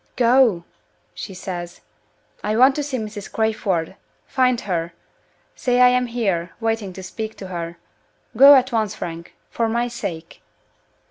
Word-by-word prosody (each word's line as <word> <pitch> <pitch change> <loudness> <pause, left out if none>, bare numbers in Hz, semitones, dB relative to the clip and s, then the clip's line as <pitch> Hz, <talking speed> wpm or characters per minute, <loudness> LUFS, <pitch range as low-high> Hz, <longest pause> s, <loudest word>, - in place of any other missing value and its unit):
"Go!" 235 -7 +4 0.5
she 195 - -8
says. 175 -2 -6 0.6
"I 210 +1 0
want 260 +3 +6
to - - 0
see 280 -2 -3
Mrs. 210 -3 -7
Crayford. 195 -6 -1 0.3
Find 255 -2 +1
her! 170 -3 -3 0.6
Say 245 -1 0
I 250 0 +8
am 250 0 +1
here, 195 -8 -2
waiting 225 -4 -1
to 190 - -9
speak 220 +4 -6
to 190 - -8
her. 170 -1 -5 0.6
Go 275 +4 +9
at 260 0 +3
once, 220 -3 0
Frank 170 0 -7 0.2
for 230 -1 0
my 235 +2 0
sake!" 195 -9 -7
220 Hz, 145 wpm, -21 LUFS, 180-245 Hz, 0.6 s, Go